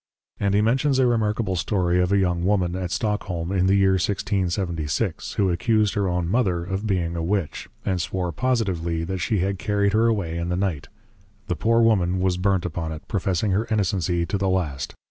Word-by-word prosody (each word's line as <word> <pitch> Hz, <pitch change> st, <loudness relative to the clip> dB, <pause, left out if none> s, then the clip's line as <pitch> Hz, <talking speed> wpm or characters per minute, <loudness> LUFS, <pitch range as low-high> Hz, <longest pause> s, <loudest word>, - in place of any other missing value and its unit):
_ -, -, -2 dB
And 100 Hz, 0 st, +2 dB
he 105 Hz, -, +4 dB
mentions 130 Hz, +5 st, +2 dB
a 130 Hz, -, +4 dB
Remarkable 110 Hz, -4 st, +1 dB
Story 90 Hz, 0 st, +1 dB
of 90 Hz, +1 st, 0 dB
a 100 Hz, -, +4 dB
young 90 Hz, -3 st, +1 dB
Woman, 90 Hz, -2 st, +1 dB
at 90 Hz, -1 st, -3 dB
Stockholm, 95 Hz, -3 st, -2 dB
in 95 Hz, -1 st, +2 dB
the 95 Hz, -, +4 dB
year 95 Hz, -1 st, +3 dB
1676, 90 Hz, -5 st, -1 dB
Who 95 Hz, -3 st, +1 dB
accused 105 Hz, +3 st, +1 dB
her 100 Hz, -2 st, 0 dB
own 90 Hz, -1 st, -1 dB
Mother 95 Hz, -5 st, +1 dB
of 95 Hz, +4 st, -3 dB
being 85 Hz, -4 st, 0 dB
a 85 Hz, -, -2 dB
Witch; 90 Hz, -1 st, -2 dB, 0.2 s
and 95 Hz, -3 st, 0 dB
swore 90 Hz, 0 st, -2 dB
positively, 95 Hz, -9 st, -1 dB
that 95 Hz, +2 st, -3 dB
she 90 Hz, +4 st, 0 dB
had 95 Hz, 0 st, -1 dB
carried 100 Hz, -1 st, +1 dB
her 110 Hz, +2 st, +4 dB
away 90 Hz, -7 st, -1 dB
in 85 Hz, +1 st, -3 dB
the 90 Hz, -, 0 dB
Night; 90 Hz, -7 st, -2 dB, 0.6 s
the 90 Hz, -4 st, -2 dB
poor 115 Hz, +5 st, +3 dB
Woman 95 Hz, -5 st, +2 dB
was 90 Hz, -1 st, +1 dB
burnt 95 Hz, -1 st, +1 dB
upon 80 Hz, -1 st, -3 dB
it: 80 Hz, -, -8 dB
professing 95 Hz, 0 st, 0 dB
her 105 Hz, +5 st, 0 dB
innocency 95 Hz, -5 st, 0 dB
to 100 Hz, -, -2 dB
the 95 Hz, -1 st, +1 dB
last. 80 Hz, -8 st, -2 dB
95 Hz, 205 wpm, -24 LUFS, 85-105 Hz, 0.6 s, he